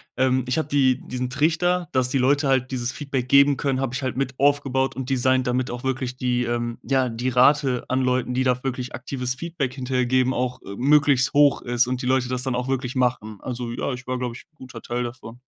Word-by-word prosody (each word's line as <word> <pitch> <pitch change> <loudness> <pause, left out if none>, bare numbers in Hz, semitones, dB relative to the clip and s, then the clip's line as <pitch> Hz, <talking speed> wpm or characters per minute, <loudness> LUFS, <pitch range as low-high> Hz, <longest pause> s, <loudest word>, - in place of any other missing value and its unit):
Ähm, 130 0 +1
ich 130 - 0
hab 155 -2 -1
die 135 -3 +2
diesen 125 0 -3
Trichter, 165 +5 +1
dass 130 -1 +1
die 135 - 0
Leute 140 +3 +2
halt 130 -1 +1
dieses 125 -1 -2
Feedback 135 -4 -3
geben 140 +1 +5
können 135 -1 -1
hab 130 -2 -2
ich 130 - -3
halt 130 -1 -2
mit 130 0 -2
aufgebaut 140 -2 +1
und 130 0 -5
designt, 130 0 +2
damit 125 0 0
auch 120 0 -6
wirklich 130 -1 -2
die, 125 -1 0
ähm 120 0 -2
ja, 130 0 +1
die 115 +2 -4
Rate 130 0 +3
an 130 +1 +1
Leuten, 125 -1 0
die 130 +1 +1
da 125 0 +1
wirklich 130 -2 -4
aktives 125 0 -3
Feedback 160 -4 -3
hinterher 125 -1 -1
geben, 130 +1 +2
auch, 125 +1 -2
äh, 100 - -8
möglichst 140 -1 +3
hoch 145 -1 +4
ist 120 0 +1
und 125 0 -2
die - - -5
Leute 130 -1 +1
das 125 0 -2
dann 130 -2 -1
auch 125 +1 -3
wirklich 130 -1 -2
machen. 115 -5 -1
Also, 120 -2 -5
ja, 125 +3 -3
ich 125 0 -7
war, 130 0 -1
glaub 125 -2 -3
ich, - - -11
'n 160 - -45
guter 125 -4 -10
Teil 120 +2 -3
davon. 120 -1 -8
130 Hz, 235 wpm, -23 LUFS, 125-135 Hz, -, geben